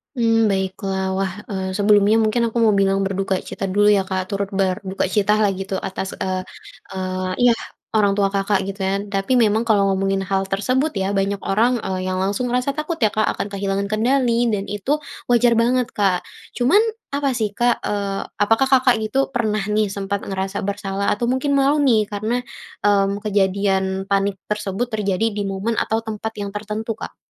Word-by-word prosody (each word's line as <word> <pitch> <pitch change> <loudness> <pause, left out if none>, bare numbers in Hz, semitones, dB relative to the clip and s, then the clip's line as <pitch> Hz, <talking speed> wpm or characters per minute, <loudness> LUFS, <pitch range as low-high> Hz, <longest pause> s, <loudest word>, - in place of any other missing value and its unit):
Mmm, 225 -2 +3
baiklah 190 0 -2
wah, 190 -1 -1 0.2
eee, 190 -1 -3
sebelumnya 205 +1 +4
mungkin 235 +2 +1
aku 225 - -8
mau 220 - +5
bilang 195 0 +2
berduka 195 0 -1
cita 195 - -4
dulu 205 +2 +4
ya 200 -1 +4
Kak 185 0 -3
turut 200 0 -1
berduka 190 0 0
cita 210 +1 +3
lah 200 - +3
gitu 195 0 -3
atas, 190 +1 -4
eee 185 0 -2 0.6
eee, 185 0 -3
iya 245 - +7 0.4
orang 205 -2 +4
tua 200 -1 +2
Kakak 200 0 +1
gitu 195 +1 -6
kan. 195 +1 0
Tapi 195 +5 0
memang 220 +1 +2
kalau 210 -3 +4
ngomongin 195 0 0
hal 195 0 0
tersebut 255 +10 0
ya 195 0 -1
banyak 200 +1 -1
orang, 225 +6 +2
eee, 185 -1 -3
yang 185 - -1
langsung 205 +6 -1
ngerasa 250 +3 0
takut 305 +4 -3
ya 215 - +4
Kak 215 0 +1
akan - - -3
kehilangan 200 0 -2
kendali 240 +1 +2
dan 210 -3 0
itu 205 +8 0 0.3
wajar 240 0 +4
banget 245 +1 +1
Kak. 195 -3 +1 0.3
Cuman 260 +12 +4 0.4
apa 280 -1 +1
sih 215 -3 -1
Kak, 240 +3 +1
eee, 200 -1 -2 0.2
apakah 225 +6 +3
Kakak 260 -2 +5
gitu 270 +5 0
pernah 215 -4 0
nih 210 -1 +1
sempat 200 0 -3
ngerasa 195 0 -3
bersalah 200 0 -2
atau 235 +3 -1
mungkin 260 +3 0
malu 275 +2 +3
nih 220 -6 +3
karena, 215 +4 -1 0.5
mmm, 200 0 +2
kejadian 200 -2 +1 0.2
panik 195 0 0
tersebut 210 +2 -2
terjadi 200 0 0
di 205 - -1
momen 195 +4 -2
atau 225 0 0
tempat 220 0 -5
yang 200 0 -5
tertentu 215 +2 -4
Kak? - - -8
205 Hz, 180 wpm, -21 LUFS, 195-225 Hz, 0.6 s, iya